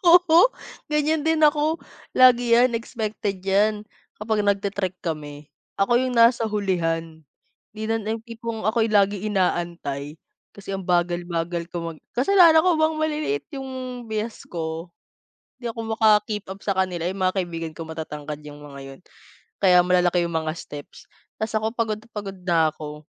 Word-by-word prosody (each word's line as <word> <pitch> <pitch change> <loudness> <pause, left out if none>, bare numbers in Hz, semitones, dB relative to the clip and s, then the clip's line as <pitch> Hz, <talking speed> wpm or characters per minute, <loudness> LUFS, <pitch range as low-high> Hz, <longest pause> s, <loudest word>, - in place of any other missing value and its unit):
Oo, 345 +5 +7 0.4
ganyan 300 +1 +1
din 320 0 +2
ako, 300 +1 +3 0.4
lagi 245 -2 +6
yan, 245 0 +4
expected 215 -4 -4
yan. 210 +2 +2 0.4
Kapag 215 0 0
nag-te-trek 200 -2 -1
kami, 150 -3 -5 0.3
ako 195 +4 +1
yung 255 -1 -1
nasa 230 -1 +5
hulihan, 165 -6 -1 0.5
hindi 215 0 -8
na, 225 0 0
yung 220 +1 -4
tipong 230 -1 -6
ako 220 +2 +1
yung 215 - +3
laging 200 -1 +2
inaantay, 170 -5 -1 0.4
kasi 195 -1 -7
ang 190 -2 -5
bagal-bagal 175 -1 -1
ko 180 - -8 0.2
mag 155 - -16 0.2
kasalanan 320 +3 +6
ko 345 -4 +3
bang 315 0 +2
maliliit 310 +7 -1
yung 270 0 -6 0.4
biyas 220 +1 -4
ko, 165 0 -4 0.7
di 245 - -7
ako 225 -1 -3
maka-keep-up 210 -3 +2
sa 195 -2 -1
kanila. 180 -2 0
Yung 190 - -6
mga 185 - +1
kaibigan 165 -2 -6
ko 165 - -7
matatangkad 150 -2 -6
yung 145 0 -10
mga 140 -1 -10
yun, - - -19 0.6
kaya 180 -2 +7
malalaki 180 0 +2
yung 170 -1 -3
mga 160 -1 -2
steps, 145 -3 -10 0.3
ta's 220 0 -2
ako 220 +1 -2
pagod 225 -3 -1
na 225 - -20
pagod 200 -2 -6
na 170 -2 +3
ako. 150 -1 -8
200 Hz, 155 wpm, -23 LUFS, 170-230 Hz, 0.7 s, Oo